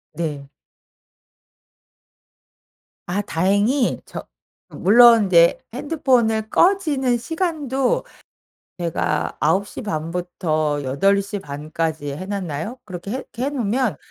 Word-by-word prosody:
네 150 -4 -4 2.6
아 190 +4 -1
다행히 205 - +1
저 - - -8 0.4
물론 230 +2 +6
인제 170 -3 +5
핸드폰을 245 -6 +1
꺼지는 300 -10 +2
시간도 320 - -1 0.7
제가 170 -2 -1
9:30 165 -1 -1
부터 155 -4 -1
8:30 155 0 -1
까지 160 -3 -2
해 185 - -6
놨나요? 195 - -4
그렇게 185 0 -7
해 260 - -3
해 265 +4 -1
놓으면 245 -3 -1
200 Hz, 160 characters per minute, -21 LUFS, 165-255 Hz, 2.6 s, 물론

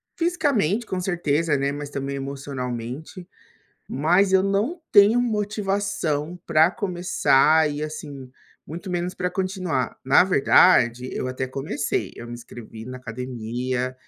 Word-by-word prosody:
fisicamente, 275 - +1
com 185 - -2
certeza, 165 -4 0
né, 140 +1 0
mas 145 0 -6
também 140 0 -4
emocionalmente, 135 +3 -6 0.6
mas 180 +8 +2
eu 190 0 +5
não 205 - 0
tenho 210 +3 +6
motivação 200 -8 -1
pra 160 +1 +4
começar 170 -5 +3
e, 145 0 -5
assim, 145 -4 -7 0.4
muito 175 +5 -7
menos 175 0 -2
pra 180 -1 -2
continuar. 185 -7 -2
Na 135 +6 +6
verdade, 130 -7 +4
eu 130 - -3
até 130 +1 -3
comecei, 135 +2 -3
eu 120 - -8
me 120 - -8
inscrevi 115 -2 -10
na 130 0 -7
academia, 125 +1 -4
155 Hz, 130 wpm, -23 LUFS, 130-190 Hz, 0.6 s, tenho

